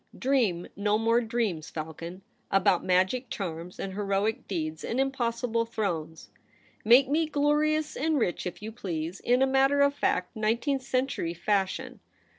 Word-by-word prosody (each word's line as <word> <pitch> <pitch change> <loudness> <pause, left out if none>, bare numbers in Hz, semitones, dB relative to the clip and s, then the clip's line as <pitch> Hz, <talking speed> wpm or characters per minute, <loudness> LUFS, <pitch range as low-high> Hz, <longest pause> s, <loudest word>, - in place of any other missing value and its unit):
Dream 235 -10 +1
no 205 +1 +1
more 230 +2 +3
dreams, 220 -9 -2
Falcon, 165 +4 -7 0.3
about 195 -2 +3
ma^ic 190 +8 +2
charms 175 -2 -5
and 190 - -4
heroic 200 +2 -1
deeds 160 -4 -3
and 240 - -2
im 270 0 +2
possible 235 -2 -1
thrones. 170 -8 -4 0.5
Make 245 +5 +6
me 310 +3 +1
glorious 300 +1 +1
and 315 +2 +1
rich 180 -8 -1
if 180 - -7
you 220 - -5
please, 175 -5 -4
in 250 +2 +3
a - - +6
matter 270 +1 +3
of 280 0 +4
fact 180 -10 -1
nineteenth 235 +6 0
century 255 -10 -1
fashion. 195 +2 -1
220 Hz, 150 wpm, -28 LUFS, 180-265 Hz, 0.5 s, Make